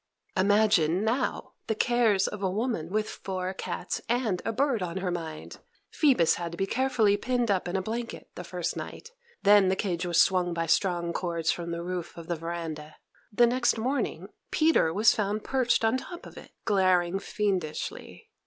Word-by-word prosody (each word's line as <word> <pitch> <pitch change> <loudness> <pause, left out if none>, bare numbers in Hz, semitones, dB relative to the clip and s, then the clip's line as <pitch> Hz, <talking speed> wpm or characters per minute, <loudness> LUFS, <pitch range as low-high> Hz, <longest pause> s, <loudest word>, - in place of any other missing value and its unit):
Imagine, 195 -3 +3
now, 225 +4 -1
the 220 - 0
cares 220 -4 +2
of 210 - -6
a 190 - +1
woman 205 -5 -2
with 215 +2 0
four 185 -1 -4
cats - - -4
and 230 -7 0
a - - -1
bird 255 -1 +1
on 180 0 -3
her 185 -1 -2
mind! 160 -3 -6 0.3
Phoebus 260 - +3
had 170 -1 -4
to 170 - -8
be 195 - +1
carefully 225 -3 +2
pinned 245 0 0
up 185 -2 0
in 175 - -3
a 190 - 0
blanket 230 +3 -5
the - - -7
first - - -3
night; 465 - -8 0.3
then 205 -1 +6
the 190 - +2
cage 185 -3 -2
was 175 -2 +1
swung 180 -2 +3
by 165 0 -1
strong 170 0 +1
cords 170 -2 -1
from 170 -1 -4
the 170 0 -4
roof 180 -1 -5
of 165 - -8
the 170 - -2
veranda. 160 -2 -6 0.4
The 240 +3 +5
next 240 0 +2
morning, 255 +5 -2 0.2
Peter 310 - +3
was 210 +5 +4
found 210 0 -1
perched 245 -3 +1
on 225 +3 +3
top 350 +6 -9
of - - -12
it, - - -11 0.2
glaring 185 -3 +2
fiendishly. 190 -7 -3
195 Hz, 180 wpm, -28 LUFS, 175-225 Hz, 0.4 s, then